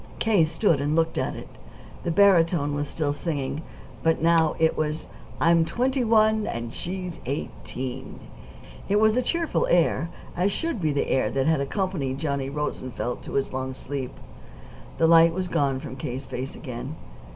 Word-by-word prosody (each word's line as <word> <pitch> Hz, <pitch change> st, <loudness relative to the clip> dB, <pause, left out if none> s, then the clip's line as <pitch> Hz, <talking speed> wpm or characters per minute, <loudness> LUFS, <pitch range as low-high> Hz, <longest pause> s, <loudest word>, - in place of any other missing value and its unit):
K. 215 Hz, -7 st, +3 dB
stood 165 Hz, -2 st, +1 dB
and 145 Hz, +2 st, 0 dB
looked 165 Hz, 0 st, +1 dB
at -, -, -1 dB
it. -, -, -8 dB, 0.6 s
The -, -, -1 dB
barytone 165 Hz, -5 st, +4 dB
was 145 Hz, 0 st, -2 dB
still 145 Hz, -2 st, -1 dB
singing; 145 Hz, -1 st, -3 dB, 0.4 s
but 165 Hz, 0 st, +2 dB
now 165 Hz, -1 st, +3 dB
it 160 Hz, 0 st, +3 dB
was 155 Hz, 0 st, -2 dB, 0.3 s
"I'm 170 Hz, 0 st, +5 dB
twenty 255 Hz, +8 st, 0 dB
one, 220 Hz, -1 st, +3 dB
and 115 Hz, 0 st, -4 dB
she's 180 Hz, -1 st, -5 dB
eighteen." 130 Hz, -2 st, -5 dB, 0.7 s
It 200 Hz, -, +3 dB
was 220 Hz, 0 st, +4 dB
a 250 Hz, -, +3 dB
cheerful 335 Hz, +5 st, 0 dB
air, 170 Hz, -1 st, +3 dB, 0.3 s
as 185 Hz, +3 st, +2 dB
should 325 Hz, -, -2 dB
be 155 Hz, -2 st, +1 dB
the 145 Hz, -, 0 dB
air 130 Hz, -, +2 dB
that 135 Hz, 0 st, 0 dB
had 160 Hz, -3 st, +2 dB
accompanied 145 Hz, -4 st, -2 dB
Johnny 140 Hz, -2 st, -2 dB
Rosenfeld 130 Hz, -4 st, -3 dB
to -, -, -8 dB
his 135 Hz, -1 st, 0 dB
long 130 Hz, 0 st, -3 dB
sleep. 130 Hz, -1 st, -5 dB, 0.8 s
The 165 Hz, -, +3 dB
light 165 Hz, 0 st, +7 dB
was 185 Hz, +1 st, -2 dB
gone 140 Hz, -6 st, +1 dB
from 130 Hz, -1 st, -7 dB
K.'s 130 Hz, +1 st, -5 dB
face 130 Hz, +2 st, -5 dB
again. 130 Hz, +2 st, -6 dB
160 Hz, 165 wpm, -25 LUFS, 135-180 Hz, 0.8 s, light